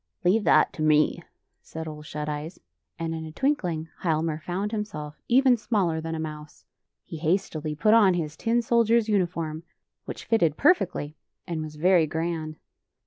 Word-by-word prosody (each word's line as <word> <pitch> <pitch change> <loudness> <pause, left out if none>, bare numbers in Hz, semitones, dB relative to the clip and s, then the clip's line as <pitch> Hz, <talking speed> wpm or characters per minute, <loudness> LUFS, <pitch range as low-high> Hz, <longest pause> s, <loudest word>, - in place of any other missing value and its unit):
" - - -49
Leave 205 +4 +3
that - - +4
to - - -7
me," 155 0 +3 0.4
said 160 0 -7
Ole 150 -1 -7
Shut 150 0 -6
Eyes, 150 +3 -5 0.4
and 165 0 -3
in 160 0 -5
a 160 - -7
twinkling 175 - -1
Hialmar 160 -2 0
found 190 +6 -3
himself 155 -9 -5
even 260 +1 +5
smaller 195 -8 0
than 165 0 -4
a - - -4
mou^e. 150 -1 -7 0.4
He 165 - -7
hastily 155 -2 -1
put 210 +9 +3
on 205 -5 +6
his 155 -3 -3
tin 235 +6 0
soldier's 230 -1 +3
uniform, 170 -6 -1 0.4
which - - -7
fitted 170 -10 +2
per 325 +6 +7
fectly 150 - -5 0.3
and 165 -2 -3
was 155 -1 -7
very 170 +1 +4
grand. 160 0 -3
165 Hz, 170 wpm, -26 LUFS, 155-210 Hz, 0.4 s, per